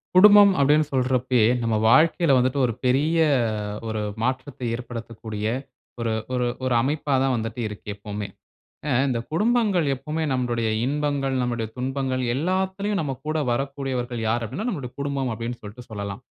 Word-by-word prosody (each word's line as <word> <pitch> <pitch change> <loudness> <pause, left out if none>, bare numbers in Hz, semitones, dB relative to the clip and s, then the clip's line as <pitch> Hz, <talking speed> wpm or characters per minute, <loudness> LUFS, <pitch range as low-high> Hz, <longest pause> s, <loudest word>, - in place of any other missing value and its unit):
குடும்பம் 205 +1 +9
அப்டின்னு 150 +2 +4
சொல்றப்பயே, 125 -2 +2 0.2
நம்ம 115 -1 0
வாழ்க்கைல 160 +4 +4
வந்துட்டு 130 +2 +1
ஒரு 120 - -1
பெரிய, 145 +6 +2 0.7
ஒரு 110 -1 -2 0.2
மாற்றத்தை 130 +1 -2
ஏற்படுத்தக்கூடிய, 115 -3 -6 0.5
ஒரு 115 -1 -1 0.2
ஒரு 125 -1 +1 0.2
ஒரு 130 - +1
அமைப்பா 145 +3 0
தான் 135 -1 +2
வந்துட்டு 115 +1 -3
இருக்கு, 105 0 -10
எப்போமே. 105 0 -6 0.6
அ, - - -1 0.2
இந்த 125 -3 0
குடும்பங்கள் 210 -2 +2
எப்போமே 155 +4 -3
நம்முடைய 120 -3 0 0.2
இன்பங்கள், 140 -1 -1
நம்முடைய 120 -2 -1
துன்பங்கள் 130 0 -1
எல்லாத்திலயும் 190 +5 -1
நம்ப 140 -4 -3
கூட 155 - 0
வரக்கூடியவர்கள் 130 -2 -2
யார்? 115 +1 0
அப்டின்னா, 135 - -4
நம்மளுடைய 135 - -5
குடும்பம் 140 -3 -1
அப்டின்னு 115 +2 -5
சொல்ட்டு 110 +4 -10
சொல்லலாம். 100 +1 -5
130 Hz, 140 wpm, -24 LUFS, 115-150 Hz, 0.7 s, குடும்பம்